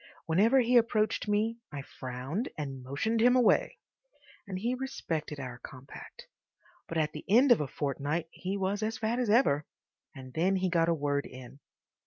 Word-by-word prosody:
Whenever 215 +11 +4
he 245 +1 +4
approached 220 -2 +1
me 215 +3 0
I 140 -2 -6
frowned 130 - -5
and 135 -3 -5
motioned 185 - -1
him 245 +2 +5
away, 250 -3 +3 0.7
and 190 -2 -4
he 235 +6 -1
respected 165 - -4
our 125 -2 -7
compact, 135 - -11 0.6
but 165 - -4
at 155 -1 +1
the 150 - -8
end 245 +6 +6
of 230 - +6
a 145 - -2
fortnight 145 +4 -2
he 190 +2 -4
was 195 +2 -1
as 220 +2 -2
fat 230 +1 -1
as 245 -4 0
ever. 205 - +4 0.5
And 130 -2 -10
then 180 +4 +2
he 185 -1 0
got 165 -1 +3
a - - +4
word 145 -1 -1
in. 130 +2 -12
180 Hz, 175 wpm, -30 LUFS, 145-225 Hz, 0.7 s, end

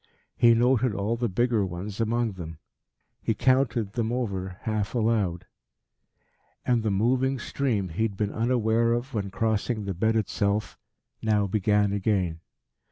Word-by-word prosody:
He 115 -1 +5
noted 125 -1 +2
all 105 +3 -1
the 120 0 -1
bigger 115 +2 +1
ones 95 +4 -5
among 115 0 0
them. 85 -4 -8 0.6
He 110 - 0
counted 120 -4 +1
them 115 -2 -1
over 95 -7 -3
half 110 0 -2
aloud. 105 -7 0 1.2
And 120 -2 +2
the 110 - 0
moving 125 +7 +1
stream 115 -7 -1
he 85 +6 -4
had 110 -4 0
been 105 -1 -1
unaware 115 0 +2
of 120 +3 -3
when 100 -3 -2
crossing 110 +2 -1
the 100 - -2
bed 110 +6 +1
itself, 105 -1 0 0.5
now 105 -2 +2
began 105 0 +1
again. 95 -5 0
110 Hz, 145 wpm, -26 LUFS, 100-120 Hz, 1.2 s, He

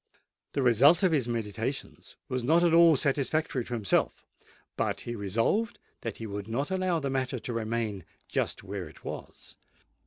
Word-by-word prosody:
The 140 - 0
result 140 - +6
of 185 - +4
his 140 -7 +1
meditations 115 +3 -4
was 130 -1 -2
not 165 +7 +4
at 170 -2 +4
all 165 -1 +7
satisfactory 140 -1 0
to 125 - -6
himself; 105 -5 0 0.5
but - - -1
he 120 - -5
resolved 115 - 0 0.2
that 115 -3 -4
he 115 - -6
would 100 -1 -5
not 135 +9 -2
allow 185 -3 +1
the 140 -3 -2
matter 130 -1 -1
to 120 +1 -5
remain 110 -3 -2 0.2
just - - -2
where - - -5
it - - -18
was. - - -8
130 Hz, 165 wpm, -29 LUFS, 115-160 Hz, 0.5 s, all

